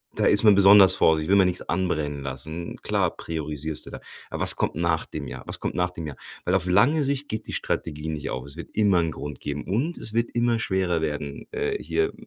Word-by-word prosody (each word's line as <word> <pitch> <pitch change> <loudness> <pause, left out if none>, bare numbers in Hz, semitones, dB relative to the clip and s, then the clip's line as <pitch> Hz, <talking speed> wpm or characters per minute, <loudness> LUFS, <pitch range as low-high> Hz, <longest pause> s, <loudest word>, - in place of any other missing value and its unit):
Da - - +1
ist 105 - +3
man 105 -2 +8
besonders 100 -1 +8
vorsichtig, 80 -1 +3
will 100 - +5
man 95 -2 +5
nix 90 0 -2
anbrennen 75 -6 -1
lassen. 75 +6 -6
Klar - - 0
priorisierst 80 -1 -4
du - - -9
da. - - -8 0.3
Aber - - -5
was - - +3
kommt - - -1
nach 85 0 0
dem - - -6
Jahr? 65 +1 -8
Was - - -3
kommt - - -3
nach 90 0 +1
dem 85 -3 -7
Jahr? 75 - -7 0.3
Weil 90 - +1
auf 95 -2 +1
lange 125 - +4
Sicht 140 +1 -2
geht 110 0 -4
die - - -6
Strategie 75 -1 -3
nicht 75 -2 -4
auf. 65 - -4
Es 70 0 -4
wird 85 - -8
immer 100 -4 +3
'n 85 -1 +1
Grund 75 -3 -7
geben. 75 0 -4
Und 130 - -1
es 110 - -7
wird 115 +1 +1
immer 120 -1 +2
schwerer 95 -5 0
werden. 75 -2 -4
Äh, 435 -1 -2
hier 405 0 0
90 Hz, 235 wpm, -25 LUFS, 75-105 Hz, 0.3 s, man